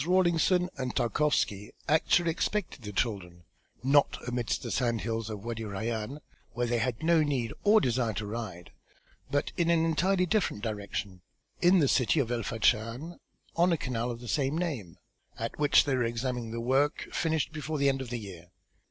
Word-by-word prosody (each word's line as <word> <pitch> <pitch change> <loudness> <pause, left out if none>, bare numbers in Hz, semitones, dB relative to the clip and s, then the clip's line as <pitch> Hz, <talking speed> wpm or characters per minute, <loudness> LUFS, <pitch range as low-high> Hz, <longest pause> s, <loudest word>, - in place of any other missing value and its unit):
Rawlinson 180 0 +3
and 130 -1 -3
Tarkowski 120 -5 0
actually 165 +2 +3
expected 180 -2 -2
the 105 -3 -6
children, 95 -5 -2 0.4
not 140 +2 +4
amidst 125 -1 -1
the - - -4
sand 120 -3 0
hills 115 -1 -3
of 105 -2 -5
Wâdi 115 +1 -4
Rayân, 110 +5 -4 0.3
where 120 +1 0
they 120 0 0
had 120 +3 -2
no 165 -1 +4
need 135 -7 -1
or 215 +1 +6
desire 120 - 0
to 105 +2 -4
ride, 105 -5 -6 0.6
but 145 +1 0
in 170 -1 +2
an 165 -1 +3
entirely 180 +4 +2
different 180 - 0
direction, 100 -4 -4 0.4
in 180 +2 +6
the 150 -6 +4
city 130 +4 +3
of 125 -4 0
El 120 -1 0
Fachn 115 +8 0 0.4
on 175 +2 +4
a 165 - +2
canal 125 -3 -2
of 120 -1 -5
the 120 - -8
same 140 +3 0
name 135 - -3 0.4
at 115 +4 -5
which 145 -1 +5
they 140 - 0
were 130 - +1
examining 120 0 -2
the 115 +1 -4
work 135 +5 +1
finished 160 -2 0
before 155 0 -3
the 140 0 +2
end 135 -1 +1
of 130 - -6
the 120 - -3
year. 95 -6 -9
125 Hz, 180 wpm, -29 LUFS, 115-155 Hz, 0.6 s, or